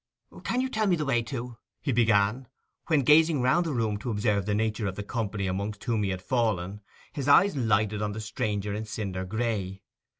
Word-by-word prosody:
'Can 250 +2 0
you 260 - 0
tell 220 -4 0
me 185 - +4
the 155 -2 -2
way 125 -4 +2
to—?' 120 -1 -6 0.2
he 140 - -2
began: 115 +1 +2 0.4
when, 155 -3 +3
gazing 155 +2 +5
round 165 +7 +3
the - - -1
room 110 -5 -1
to 120 - -5
observe 105 -2 0
the 105 - +1
nature 110 0 -1
of 95 - -4
the 105 - -5
company 105 -3 -3
amongst 100 +3 -3
whom 115 -4 0
he 100 - 0
had 95 -1 -4
fallen, 105 -5 -1 0.3
his 140 -3 -4
eyes 180 +7 +5
lighted 110 -4 +1
on 105 -1 -2
the 110 - -5
stranger 105 -1 -2
in 110 +2 -4
cinder 100 -3 -4
gray. 105 -2 -3
110 Hz, 205 wpm, -27 LUFS, 100-130 Hz, 0.4 s, gazing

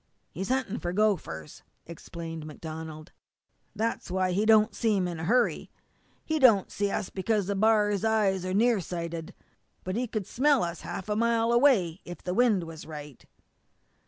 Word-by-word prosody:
"He's 190 +4 -5
hunting 255 -4 -1
for 175 0 -3
gophers," 180 - -1 0.2
explained 165 -1 -8
MacDonald. 155 0 -8 0.6
"That's 225 -1 -2
why 185 0 0
he 205 +4 +1
don't 220 0 +5
seem 205 -6 +1
in 170 -2 -5
a 160 - -4
hurry. 245 +7 +1 0.6
He 315 0 0
don't 225 -8 +5
see 205 0 -1
us 195 - -3
because 205 0 0
a - - -1
b'ar's 210 -1 +2
eyes 210 -4 +2
are 185 - -3
near 225 +3 +3
sighted, 170 -2 -5 0.5
but 185 +1 -3
he 245 +2 -1
could 215 -3 -3
smell 280 +2 +2
us 170 -1 -4
half 190 - -6
a 210 - -1
mile 230 +1 +2
away 235 - +3
if 175 - -9
the 180 - -2
wind 225 -5 +3
was 165 -2 -9
right." 150 -4 -9
195 Hz, 165 wpm, -28 LUFS, 170-225 Hz, 0.6 s, don't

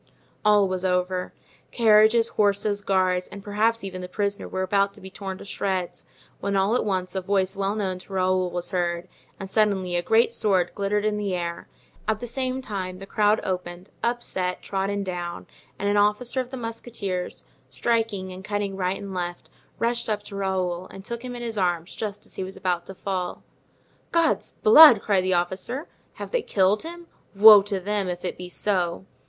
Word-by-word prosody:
All 210 -2 +5
was 185 0 -3
over; 180 0 0 0.4
carriages, 225 0 +5
horses, 205 0 +1
guards, 185 -2 +1
and 200 - -10
perhaps 220 +2 +1
even 185 -2 -5
the 180 - -7
prisoner 200 +1 -2
were 190 - -2
about 200 +1 +1
to - - -9
be 190 0 -10
torn 190 -1 -6
to - - -11
shreds, 190 -3 -3 0.3
when 200 0 -1
all 195 +4 +2
at - - +1
once 185 -3 -2
a 190 - -2
voice 190 0 +1
well 195 +1 -1
known 190 -4 -2
to 195 - -12
Raoul 185 -1 +1
was 175 +1 -3
heard, 175 -1 -1 0.3
and 195 - -5
suddenly 190 -3 +1
a 175 - +2
great 225 +5 +3
sword 185 -6 +1
glittered 205 +1 0
in 210 -1 +1
the 200 -3 -1
air; 170 -1 -4 0.4
at 220 -1 +1
the 245 - -5
same 255 +2 -3
time 185 -5 -4
the 195 - -9
crowd 210 +2 +2
opened, 180 0 -4
upset, 210 -6 -2
trodden 200 +1 -2
down, 175 -2 -5 0.3
and 200 - -2
an 205 0 +2
officer 210 +5 +2
of 250 - -8
the 260 - -6
musketeers, 225 -6 -5 0.2
striking 200 - -1
and 185 +1 -9
cutting 205 -1 -2
right 185 0 -1
and 200 -1 -7
left, 175 -1 -5 0.3
rushed 235 0 0
up 210 -1 -1
to 205 - -9
Raoul 185 -2 -1
and 195 0 -11
took 235 +1 -5
him 250 -1 -6
in 240 - -6
his 225 -3 -3
arms 175 -2 0
just 205 -1 -5
as - - -13
he - - -2
was 190 +1 -8
about 175 -2 -1
to 195 - -8
fall. 185 -2 -4 0.7
"God's 335 -1 +1
blood!" 315 - +8
cried 195 -3 +2
the 185 -1 +2
officer, 185 - -2 0.3
"have - - -8
they - - +1
killed 200 - +2
him? 340 +1 -7 0.3
Woe 210 0 +10
to 200 -1 -3
them 200 +1 -1
if 180 0 -4
it - - -3
be 180 0 -8
so!" 180 -2 -1
195 Hz, 195 wpm, -25 LUFS, 185-215 Hz, 0.7 s, Woe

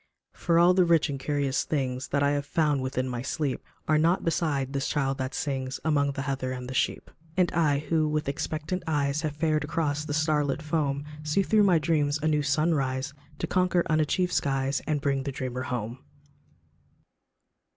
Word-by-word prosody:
For 170 -1 +1
all 175 +2 +6
the 185 0 +4
rich 165 -3 +3
and 135 - -4
curious 140 -1 0
things 130 -3 -2
That 140 0 +1
I 140 - +3
have 145 0 -1
found 150 -3 +1
within 130 0 -2
my 125 -2 -3
sleep, 140 +1 -2 0.2
Are 155 -1 +4
nought 170 +4 +2
beside 150 -6 0
this 140 -1 -1
child 135 -2 -1
that 130 +1 -3
sings 135 -3 -3
Among 145 -3 +2
the 135 - -4
heather 135 -2 -2
and 125 -1 -6
the 130 - -5
sheep; - - -1 0.3
And 180 -2 +3
I, 155 -4 +2
who 155 +1 0
with 150 0 -1
expectant 155 +4 -3
eyes 145 -1 0
Have 155 -3 -3
fared 155 0 +1
across 150 -1 -1
the 145 -1 -3
star 155 -1 +2
lit 145 +2 -2
foam, 145 -2 -1 0.2
See 150 +6 +1
through 210 +1 +4
my 180 -4 +5
dreams 150 -2 +1
a - - +2
new 150 -1 +2
sun 155 +3 +2
rise 135 -1 -1 0.2
To - - -2
conquer 180 -1 +2
unachieved 155 +4 +1
skies, 135 0 0
And 150 -2 0
bring 140 -1 0
the 140 +1 -3
dreamer 125 -1 -4
home. 125 -2 -4
145 Hz, 195 wpm, -27 LUFS, 135-155 Hz, 0.3 s, all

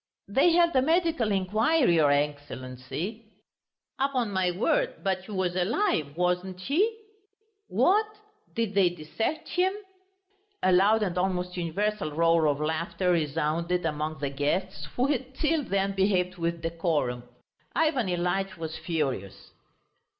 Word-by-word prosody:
"They 275 - +4
held 340 -2 +4
a 260 - +5
medical 320 -6 +1
inquiry, 210 - +2
your 150 -2 +4
Excellency." 145 - -3 0.8
"Upon 260 -5 0
my 190 -2 +1
word, 470 - +1
but 190 -1 -1
he 215 - -10
was 185 -3 -1
alive, 185 - 0
wasn't 180 +1 0
he?" 400 - 0 0.7
"What! 425 +3 +3 0.5
Did 225 -3 -1
they 195 -3 +4
dissect 175 - -4
him?" 365 +1 +2 0.9
A 185 - +4
loud 205 +4 +4
and 180 -3 -1
almost 180 -1 -1
universal 190 +3 -1
roar 165 0 +3
of 145 -1 +1
laughter 170 +4 -1
resounded 165 +2 0
among 155 0 -2
the 140 -2 -3
guests, 150 +3 -2
who 250 - +2
had 265 -2 -2
till 310 +2 +1
then 195 -4 0
behaved 190 -2 +1
with 170 0 -2
decorum. 160 -7 -1 0.5
Ivan 300 -9 +2
Ilyitch 180 +2 -1
was 160 -1 -5
furious. 135 - -3
185 Hz, 130 wpm, -27 LUFS, 165-230 Hz, 0.9 s, a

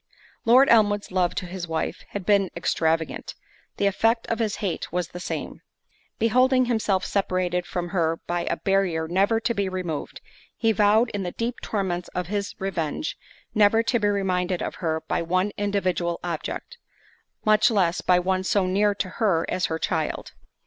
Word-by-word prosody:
Lord 255 +4 +7
Elmwood's 205 -3 +3
love 180 -2 +1
to 185 - -3
his 180 0 -6
wife 160 -1 -3
had 200 -3 -5
been 200 -3 +3
extravagant—the 165 +4 -2
effect 225 +4 +2
of 230 - -1
his 220 -3 0
hate 185 -6 -3
was 175 -1 -2
the 180 - -8
same. - - -5 0.6
Beholding 255 +3 +3
himself 215 -5 0
separated 180 -2 0
from 175 -2 -3
her 165 -3 +1
by 175 0 -2
a - - -1
barrier 185 -5 +1
never 195 +6 +2
to 230 +1 0
be 200 -3 -1
removed, 180 -5 -4 0.4
he 225 -1 +2
vowed 215 +3 +3
in 205 - -3
the 180 -2 -4
deep 235 +1 -3
torments 180 -4 -2
of 180 - -1
his 200 +2 -3
revenge, 190 - -3 0.4
never 215 +1 +4
to 240 +1 +1
be 210 - +1
reminded 185 -3 0
of - - -3
her 160 -2 0
by - - 0
one 185 +4 0
individual 185 -4 -1
object; 175 - -5 0.7
much 215 0 +5
less, 185 -6 +1
by 180 - +4
one 185 +1 0
so 190 0 +2
near 200 +2 +2
to 195 - -2
her 180 -7 +3
as 185 - 0
her 160 - -2
child. 160 -1 -2
190 Hz, 170 wpm, -25 LUFS, 175-210 Hz, 0.7 s, Lord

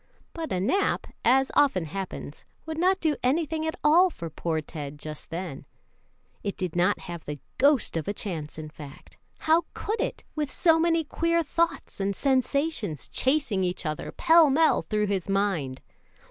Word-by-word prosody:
But 330 -2 -5
a 185 - 0
nap, 375 - +1 0.2
as 265 +3 +4
often 225 - +3
happens, 180 -3 -6 0.2
would 320 0 -4
not 375 +2 +3
do 315 -4 +1
anything 315 +4 0
at 320 - -2
all 340 +5 +6
for 165 - -7
poor 160 0 -2
Ted 145 -2 -7
just 150 0 -8
then. 165 -4 -5 0.8
It 200 - -4
did 180 -3 -3
not 180 +4 +2
have 170 -2 -7
the 145 0 -5 0.2
ghost 280 - +4
of 160 -2 -2
a 205 - 0
chance, 160 -9 -4
in 155 -1 -6
fact. 150 -3 -12 0.2
How 320 +2 +3
could 430 +2 -2
it - - -3
with 300 -2 -2
so 325 -2 +4
many 330 0 +2
queer 335 +2 +1
thoughts 335 -3 -1
and 195 0 -1
sensations 265 - 0
chasing 260 -8 +1
each 180 0 -2
other 155 -1 -3
pell 330 -2 +5
mell 315 +4 +4
through 210 -1 0
his 195 -2 -2
mind. 190 -10 0
215 Hz, 170 wpm, -27 LUFS, -, 0.8 s, all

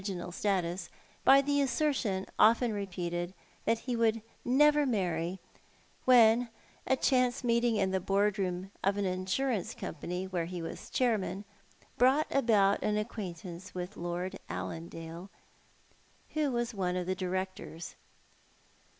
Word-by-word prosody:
inal 185 -3 -5
status, 180 -3 -1 0.3
by 275 +1 +7
the 285 0 +2
assertion, 260 -9 0
often 230 +1 +5
repeated, 175 -2 -3 0.3
that 225 +1 +3
he 250 +2 -4 0.5
never 295 +4 +5
would 285 -2 +2
marry, 180 -4 -1 0.7
when 240 -1 +6 0.4
a 265 - +4
chance 250 -1 +2
meeting 235 -1 +2
in 195 -2 +1
the 190 - +1
board 200 +2 +1
room 185 0 -2
of 195 +1 +2
an 200 - 0
insurance 185 +4 -1
company, 180 +3 -5
whore 175 -3 -2
he 180 0 -5
was 165 -1 -7
chairman, 205 -5 0 0.5
brought 265 +5 +5
about 210 -7 +3
an 210 0 +1
acquaintance 185 -5 -6
with 180 +3 -5
Lord 175 +3 -4
Allandale, 165 +2 -6 1.0
who 305 -2 +1
was 240 -1 -1
one 180 -3 -1
of 180 -1 -1
the 185 - 0
directors. 185 -2 -4
195 Hz, 130 wpm, -31 LUFS, 180-240 Hz, 1.0 s, by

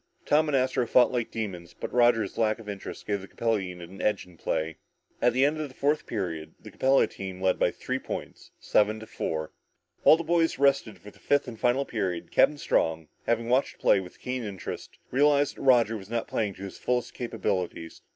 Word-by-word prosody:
Tom 155 +1 +3
and 140 - +3
Astro 130 -2 +1
fought 125 +2 +5
like 120 -3 -1
demons 90 -6 -5
but - - -5
Roger's 120 -4 +3
lack 110 -1 +1
of 115 -2 -13
interest 100 -1 -7
gave 100 -2 -1
the 95 - -10
Capella 115 0 0
unit 90 -2 -7
the - - -7
edge 105 -2 +1
in 90 -1 -17
play. 80 -1 -2 0.4
At 120 - +4
the 130 +3 +3
end 155 +2 0
of 150 - -4
the 130 - -17
fourth 145 +2 0
period, 85 -8 -4
the - - -12
Capella 135 +1 +4
team 95 -1 -7
led 95 -1 +1
by - - +4
three - - -4
points, - - -7
seven 105 +1 +2
to - - -8
four. 80 -8 -3 0.5
While 160 - +7
the 170 - -4
boys 165 0 +2
rested 140 -5 +2
before 105 - -13
the - - -22
fifth 145 -1 +1
and 115 -3 -8
final 125 +3 +2
period, 95 -8 -3
Captain 150 - +4
Strong, 80 - 0 0.2
having 115 0 +1
watched 130 +3 +2
the - - -28
play - - +4
with 90 -1 -10
keen 125 -1 -3
interest, 100 -4 -7
realized 145 +1 +3
that - - -9
Roger 120 -4 +4
was 100 -2 -8
not 115 0 -2
playing 105 -3 -1
up - - -19
to 95 - -9
his 100 - -8
fullest 125 0 -1
capabilities. 95 -8 -3
115 Hz, 220 wpm, -27 LUFS, 95-130 Hz, 0.5 s, While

